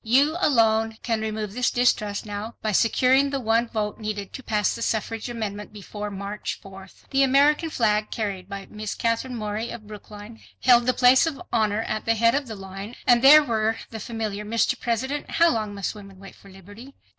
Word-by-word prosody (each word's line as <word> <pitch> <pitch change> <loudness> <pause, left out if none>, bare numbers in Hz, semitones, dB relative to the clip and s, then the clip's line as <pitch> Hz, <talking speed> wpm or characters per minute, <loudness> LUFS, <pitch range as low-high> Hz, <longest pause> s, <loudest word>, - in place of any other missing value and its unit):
YOU 275 +7 +3
ALONE 225 -4 +2
CAN 225 -2 -1
REMOVE 215 -2 -4
THIS 250 +1 +1
DISTRUST 215 -5 0
NOW 210 +2 -6
BY 215 - 0
SECURING 255 +6 +3
THE 275 0 -2
ONE 230 0 +1
VOTE 215 -2 -3
NEEDED 210 -2 -5
TO - - -7
PASS 210 -4 0
THE 230 - -7
SUFFRAGE 225 +1 -2
AMENDMENT 210 -3 -5
BEFORE 210 0 -7
MARCH 200 +1 -5
4. 195 -1 -12 0.2
The 270 0 +2
American 285 +4 +3
flag 215 -6 +1
carried 200 -4 -4
by 200 -1 -6
Miss 215 -1 -5
Katherine 230 +2 -1
Morey 215 +1 -4
of 220 -2 -8
Brookline 210 +1 -11 0.2
held 240 -1 +5
the 255 - +2
place 255 +4 +5
of 300 -4 -4
honor 215 -1 +1
at 215 -1 -4
the 230 - +2
head 230 +1 +3
of 280 -1 -1
the 220 - -6
line 195 +3 -8
and 240 -1 +5
there 300 +3 +9
were 225 -3 0
the 220 - -6
familiar, 215 -2 -4
"Mr. 230 +4 0
President, 260 +5 -2
how 335 0 +4
long 215 -3 -3
must 200 -2 -3
women 195 -3 -13
wait 195 0 -12
for 200 - -18
liberty?" 205 +8 -13
220 Hz, 195 wpm, -24 LUFS, 210-245 Hz, 0.2 s, there